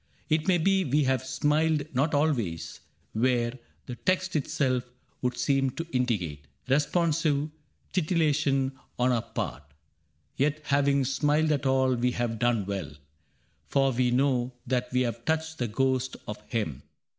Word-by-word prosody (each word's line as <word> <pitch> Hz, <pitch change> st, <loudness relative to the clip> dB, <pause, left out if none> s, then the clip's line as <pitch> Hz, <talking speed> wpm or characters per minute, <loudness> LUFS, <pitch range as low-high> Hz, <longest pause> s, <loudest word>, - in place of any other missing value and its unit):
It 155 Hz, +2 st, +1 dB
may 185 Hz, -2 st, +5 dB
be 195 Hz, +3 st, +3 dB
we 145 Hz, 0 st, +2 dB
have 130 Hz, -1 st, +1 dB
smiled 150 Hz, +3 st, +1 dB
not 145 Hz, +4 st, +1 dB
always 110 Hz, -, -1 dB, 0.3 s
where 120 Hz, +1 st, +1 dB, 0.3 s
The 125 Hz, -, -6 dB
text 185 Hz, 0 st, 0 dB
itself 130 Hz, -4 st, 0 dB, 0.3 s
would 125 Hz, -1 st, -1 dB
seem 135 Hz, -2 st, +2 dB
to 165 Hz, -, -3 dB
indicate 90 Hz, -, -1 dB, 0.2 s
Responsive 150 Hz, +1 st, +1 dB, 0.4 s
titillation 150 Hz, -6 st, +2 dB, 0.3 s
on 125 Hz, +1 st, +3 dB
our 120 Hz, -2 st, +2 dB
part, -, -, -4 dB, 0.4 s
— 75 Hz, -1 st, -44 dB
Yet 150 Hz, +2 st, +1 dB
having 140 Hz, -1 st, +2 dB
smiled 150 Hz, +4 st, +2 dB
at 145 Hz, -2 st, +1 dB
all 130 Hz, -1 st, +3 dB
we 125 Hz, 0 st, +1 dB
have 120 Hz, -2 st, -2 dB
done 120 Hz, -4 st, +2 dB
well. 95 Hz, -7 st, -4 dB, 0.7 s
For 135 Hz, -1 st, +2 dB
we 125 Hz, 0 st, +1 dB
know 125 Hz, -1 st, +1 dB
that 125 Hz, 0 st, -1 dB
we 125 Hz, 0 st, +2 dB
have 120 Hz, -1 st, -2 dB
touched 160 Hz, +1 st, -1 dB
the 120 Hz, -, 0 dB
ghost 130 Hz, +3 st, 0 dB
of 105 Hz, 0 st, -6 dB
him. 105 Hz, -, -2 dB
130 Hz, 145 wpm, -28 LUFS, 120-150 Hz, 0.7 s, may